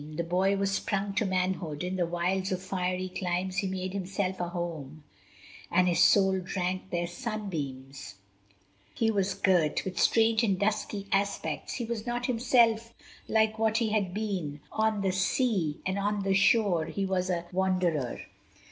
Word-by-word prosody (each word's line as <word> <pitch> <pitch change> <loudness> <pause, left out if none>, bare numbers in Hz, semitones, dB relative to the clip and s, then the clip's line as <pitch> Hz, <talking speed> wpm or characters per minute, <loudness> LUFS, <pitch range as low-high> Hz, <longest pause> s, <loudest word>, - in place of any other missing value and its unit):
The 170 - -1
boy 185 +4 +1
was 195 0 0
sprung 195 0 -1
to 210 +2 +1
manhood: 185 -4 -1
in 180 +1 -2
the 175 -2 0
wilds 180 +3 -1
Of 185 - 0
fiery 185 -1 -2
climes 185 0 -2
he 200 -1 +1
made 185 0 -3
himself 190 0 -2
a 175 -1 -2
home, 160 -4 -5 0.7
And 180 +1 +3
his 175 -2 +2
soul 190 -2 +5
drank 185 0 -3
their 175 -1 -1
sunbeams: 155 - -5 0.8
he 225 -1 +2
was 195 -2 0
girt 180 -6 +2
With 185 - -4
strange 225 0 +4
and 200 -4 +2
dusky 205 0 -1
aspects; 195 -6 -1
he 240 - -3
was 230 0 -4
not 240 0 -1
Himself 230 -2 +2 0.3
like 220 0 +2
what 220 0 +2
he 225 -1 +1
had 210 -4 0
been; 185 -8 -3
on 220 -1 +1
the 190 -1 +1
sea 190 - 0
And 190 +1 -1
on 205 0 0
the 195 0 +1
shore 195 -4 +3
he 195 +4 -2
was 190 -1 -1
a 175 -1 -1
wanderer. 180 -8 0
190 Hz, 165 wpm, -29 LUFS, 180-210 Hz, 0.8 s, soul